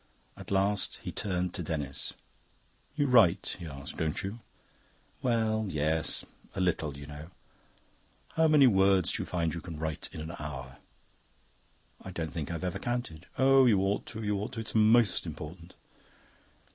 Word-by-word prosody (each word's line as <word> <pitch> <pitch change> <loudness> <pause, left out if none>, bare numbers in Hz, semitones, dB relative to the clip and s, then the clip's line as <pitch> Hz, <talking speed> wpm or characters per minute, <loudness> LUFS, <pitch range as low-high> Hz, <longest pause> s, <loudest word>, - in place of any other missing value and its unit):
At - - -11
last 100 +1 +2
he - - -4
turned 90 -3 -2
to - - -3
Denis. 75 -5 -3 0.8
"You 145 -2 +2
write," 115 -9 +4
he 85 - -6
asked, 70 -2 -8
"don't 80 -1 -1
you?" 100 +5 -5 0.8
"Well, 110 -3 +1
yes 80 0 +1 0.3
a - - -3
little, 80 -6 0
you 70 - -9
know." 75 +2 -9 1.0
"How 160 0 +3
many 150 -3 +6
words 95 -5 +4
do - - -2
you - - -5
find 85 -3 -1
you 85 - -5
can 85 -4 -7
write 80 +1 -4
in 85 - -8
an 80 +2 -6
hour?" 65 -4 -6 1.2
"I - - -8
don't 80 -4 -4
think 75 -4 -4
I've 85 -1 -4
ever 90 -2 -2
counted." 120 -10 -4
"Oh, 135 0 +6
you 105 -5 +5
ought 100 +1 0
to, 110 -1 -6
you 105 -1 0
ought 105 - -4
to. 115 - -4
It's 110 - -5
most 110 -3 +4
important." 80 +3 -8
90 Hz, 165 wpm, -30 LUFS, 80-110 Hz, 1.2 s, many